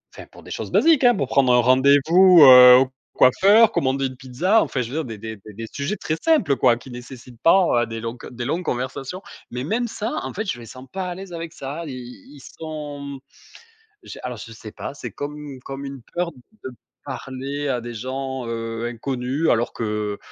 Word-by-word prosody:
enfin - - -11
pour - - -15
des - - -12
choses - - -5
basiques, 315 -5 +4
hein, 245 -2 +6
pour 140 -8 -2
prendre 130 -2 +3
un 125 - +5
rendez-vous, 145 +8 +5
heu, 125 -1 +10
au 130 -1 +1 0.2
coiffeur, 205 - +5
commander 135 0 0
une 130 -1 -10
pizza, 170 - +1
enfin 130 - -2
je 115 - -5
veux 160 +2 -2
dire - - -9
des 115 -3 -7
des 110 0 -7
des 105 +1 -14
des 115 +2 -7
sujets 145 +9 -3
très 155 -5 -3
simples 255 - +3
quoi, 125 -2 +4
qui 125 +2 -13
nécessitent 120 -1 -11
pas 165 -9 +4
des 115 0 -6
longs 115 +1 -5
que - - -10
des 120 -1 -6
longues 170 +6 -2
conversations, 130 +7 -4 0.3
mais 125 +1 -5
même 235 - -1
ça, 220 +1 -4
en - - -6
fait, 215 +3 -4
je 120 - -7
les 115 - -10
sens 130 +3 -11
pas 190 -1 -3
à 175 - -5
l'aise 190 -1 -9
avec 165 -1 -6
ça, 145 +5 -6
ils - - -6
ils 125 +1 -11
ils 140 - -14 0.2
sont 145 -3 -6 0.9
j'ai - - -10
alors 125 -3 -5
je 115 +1 -10
sais 110 -1 -10
pas, - - -7
c'est - - -7
comme 145 +1 -6
une 145 -3 -9
comme 135 +2 -8
une 135 -1 -7
peur 175 0 -1
de 130 - -12 0.3
parler 140 +2 -5
à 125 -2 -1
des 120 0 -8
gens, 130 +2 -5
heu, 115 0 -4
inconnus 125 +5 -2
alors 120 0 +1
que, 105 -2 -3
135 Hz, 220 wpm, -22 LUFS, 120-160 Hz, 0.9 s, heu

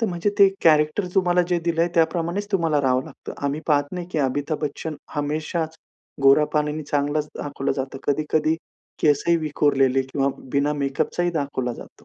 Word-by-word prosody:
तर 225 - +2
म्हणजे 175 +2 -1
ते 200 -1 +8 0.2
कॅरेक्टर 155 +4 +4
तुम्हाला 180 -2 +3
जे 175 -1 +2
दिलंय, 170 0 +1
त्या 165 -1 +6
प्रमाणेच 175 +4 -2
तुम्हाला 165 -6 +2
राहावं 130 -1 +2
लागतं. - - -10
आम्ही 145 +2 -1
पाहत 145 -2 +3
नाही 175 -1 -4
की 155 - 0
अमिताभ 145 +3 -1
बच्चन 150 +2 -4 0.2
हमेशाच 155 +2 -2 0.5
गोरापान 150 +2 +4
आणि 155 +1 -4
चांगलाच 145 +1 -1
दाखवलं 140 -1 -2
जातं. 135 0 -4
कधी-कधी 155 +2 +1 0.5
केस 145 -2 +3
ही 170 - +5
विखुरलेले 140 -4 +2
किंवा 135 +1 -1 0.2
बिना 145 +1 +2
मेकअपचा 140 +4 -1
ही 175 - +1
दाखवला 140 -5 -2
जातो. - - -13
150 Hz, 170 wpm, -23 LUFS, 140-170 Hz, 0.5 s, ते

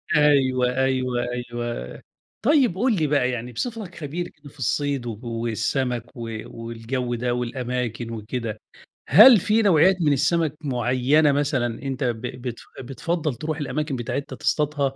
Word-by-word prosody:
أيوه، 130 -4 +3
أيوه، 130 -2 +1
أيوه، 120 - -5 0.4
طيب 260 - +3
قُل 235 +1 +2
لي 155 -4 +1
بقى 140 -3 +2
يعني 120 0 -5
بصفتك 215 - -5
خبير 165 +3 -4
كده 150 -4 -15
في 140 - -21
الصيد 135 +2 -1
والسَمَك 120 +2 -2
و 115 -2 -5
والجو 115 +2 -4
ده 120 +1 -1
والأماكن 125 -1 -3
وكده، 110 0 -4 0.5
هل 215 - +9
في 215 +5 +2
نوعيات 185 -2 +5
من 150 -2 +3
السَمَك 160 +2 +1
معيّنة 130 +2 +2
مثلًا 135 -5 0
أنت 135 0 -3
ب 120 -3 -1
بتف 125 -1 -6 0.2
بتفضّل 150 +2 -2
تروح 155 +5 -4
الأماكن 145 +1 -2
بتاعتها 125 +3 -4
تصطادها؟ 145 -3 0
130 Hz, 135 wpm, -23 LUFS, 120-150 Hz, 0.5 s, هل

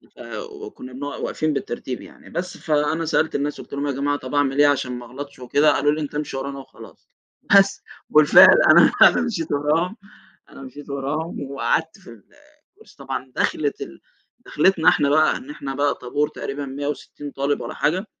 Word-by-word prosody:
فو 425 -4 -8
وكنّا 130 - -11
بنقع 145 +2 -6
واقفين 155 -1 -2
بالترتيب 125 -1 -5
يعني، - - -15
بس 175 +2 -5
فأنا 155 +1 0
سألت 160 0 0
الناس 145 +1 -2
قُلت - - -14
لهم: 140 +1 -2
"يا - - 0
جماعة 145 +2 -1
طَب 130 +2 -7
أعمل 140 0 +1
إيه 145 - +6
عشان 130 -3 0
ما 125 -1 -7
اغلطش 140 +3 -9
وكده؟" 145 +4 +3
قالوا 145 +1 +2
لي: 155 - -2
"أنت 150 -1 -6
امشي 150 -2 -3
ورانا 140 +1 -5
وخلاص." 135 - -15 0.5
بس 195 0 +3 0.3
وبالفعل 150 -1 +7
أنا، - - +7
أنا - - +7
مشيت 205 -10 -3
وراهم، 160 - 0 0.5
أنا - - -13
مشيت 135 +2 -11
وراهم 140 +1 -4
وقعدت 160 +3 -1
في 185 - -16 0.6
الكُرسي 440 +3 -20
طبعًا، 130 -1 -6
دَخلة 145 -2 0
ال 70 - -9 0.4
دَخلِتنا 165 +1 +3
إحنا 140 - +2
بقى 155 +2 +3
إن 260 - -12
إحنا 135 - -6
بقى 145 +1 +1
طابور 145 +4 -2
تقريبًا 140 +1 -6
160 145 +1 -6
طالب 140 +1 -1
واّلا - - -6
حاجة. 180 +7 0
145 Hz, 180 wpm, -22 LUFS, 140-155 Hz, 0.6 s, وبالفعل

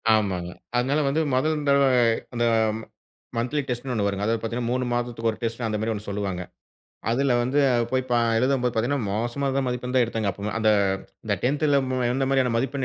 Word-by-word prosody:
ஆமாங்க. 95 -5 -1 0.3
அதுனால, 135 +5 +1
வந்து 145 +4 +1
முதல் 150 +3 +1
தடவ 140 0 +5 0.5
இந்த 120 0 +1 0.9
மந்த்லி 125 +6 0
டெஸ்ட்னு 125 +1 -3
ஒண்ணு 105 -4 0
வருங்க. 100 0 -2
அதாவது 115 0 0
பாத்தீங்கன்னா, 115 +1 -2
3 125 0 0
மாதத்துக்கு 120 -1 -1
ஒரு 110 - -10
டெஸ்ட் 115 +1 -2
அந்த 105 -1 -2
மாரி 110 +1 0
ஒண்ணு 105 0 -7
சொல்லுவாங்க. 100 -3 -3 0.7
அதுல 135 +3 +2
வந்து 130 +4 0 0.3
போய் 130 0 +1
ப - - +1 0.3
எழுதும்போது 125 -1 +1
பாத்தீங்கன்னா, 120 +1 0
மோசமான 130 +6 -1
மதிப்பெண் 125 +1 -3
தான் 125 - +5
எடுத்தங்க. 110 -3 -1
அப்ப 100 +3 -5
அந்த 110 -1 +3 0.5
இந்த 105 -2 +1
10ல 145 +2 +3
மு 130 - 0
எந்த 135 +1 0
மாதிரியான 130 -3 +2
மதிப்பெண், 135 +2 -1
120 Hz, 180 wpm, -25 LUFS, 110-135 Hz, 0.9 s, தடவ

